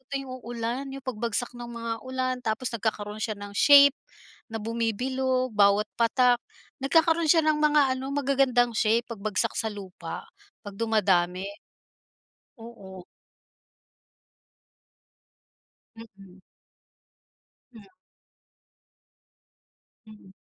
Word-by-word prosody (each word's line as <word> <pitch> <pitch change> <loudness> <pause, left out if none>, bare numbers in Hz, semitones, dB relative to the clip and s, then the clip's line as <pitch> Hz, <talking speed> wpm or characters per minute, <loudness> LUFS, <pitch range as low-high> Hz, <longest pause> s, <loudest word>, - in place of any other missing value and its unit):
tuwing 275 -1 -4
uulan 235 +3 -4
yung 270 0 -9
pagbagsak 235 -1 -3
ng 240 0 -8
mga 230 -1 -4
ulan 255 0 -2
tapos 230 +3 -2
nagkakaroon 215 -1 -3
siya 215 -2 -3
ng 205 0 -9
shape 285 +5 +7 0.5
na 225 - -6
bumibilog, 255 +3 -1
bawat 205 0 +4
patak 245 +1 +3 0.4
nagkakaroon 320 +4 +2
siya 325 0 +5
ng 310 -1 +3
mga 295 -3 +3
ano 265 +1 -5
magagandang 270 -4 +2
shape 225 +2 +2
pagbagsak 215 +2 -1
sa 225 -4 -1
lupa, 185 -5 -8 0.4
'pag 205 -1 -8
dumadami. 190 -5 +1 1.2
Oo. 190 -5 -11 2.9
Mm. 195 -4 -15 1.4
Mm. 205 -3 -14 2.2
Mm. 210 -3 -15
230 Hz, 95 wpm, -26 LUFS, 210-260 Hz, 2.9 s, shape